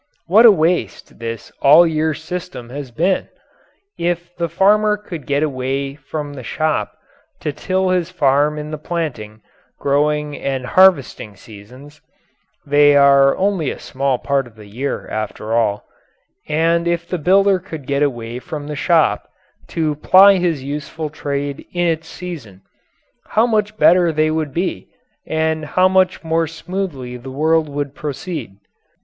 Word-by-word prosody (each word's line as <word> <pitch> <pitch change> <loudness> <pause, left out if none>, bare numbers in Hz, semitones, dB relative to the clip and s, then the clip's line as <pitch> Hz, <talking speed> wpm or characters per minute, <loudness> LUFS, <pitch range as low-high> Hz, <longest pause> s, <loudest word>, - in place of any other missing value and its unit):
What 215 +7 +7
a - - +9
waste 175 -1 -1
this 115 -1 -6
all 150 +5 +7
year 160 -1 0
system 160 -7 -7
has 140 -1 -6
been! 175 +10 0 0.7
If 175 0 -2
the 170 -1 -2
farmer 210 +5 +3
could 170 -9 -9
get 145 +1 +1
away 135 -1 -2
from 145 0 -6
the 135 - -8
shop 155 +6 -2 0.4
to 150 - -3
till 185 +3 -1
his 180 -2 0
farm 145 -3 +2
in 150 0 -6
the 155 - -5
planting, 125 -11 -5 0.4
growing, 150 +1 0
and 135 -2 -3
harvesting 145 - +3
seasons 125 +9 -14 0.6
(they 145 0 +5
are 140 -1 +5
only 190 -6 0
a - - -5
small 135 -1 -2
part 135 0 -1
of 115 - -18
the 105 -1 -13
year, 125 +8 -4
after 110 0 -4
all), 105 -3 0 0.6
and 165 +2 +1
if 170 0 -1
the 180 - -3
builder 195 +4 +3
could 160 -6 -9
get 140 +1 -1
away 120 -4 -2
from 145 +3 -7
the 150 0 -5
shop 160 +2 +1 0.4
to 155 -2 -1
ply 190 +6 +6
his 170 -6 -1
useful 150 +2 -5
trade 140 -2 -4
in 175 0 0
its 165 -1 -1
season, 140 - -9 0.6
how 220 +2 +2
much 215 -2 -1
better 175 -3 +5
they 155 0 +1
would 155 -2 -2
be, 170 - -3 0.4
and 160 0 -1
how 185 +5 +2
much 185 -1 +1
more 165 0 0
smoothly 160 -7 -5
the 125 +2 -10
world 155 +3 +1
would 145 -1 -4
proceed. 150 - -6
155 Hz, 150 wpm, -18 LUFS, 140-175 Hz, 0.7 s, a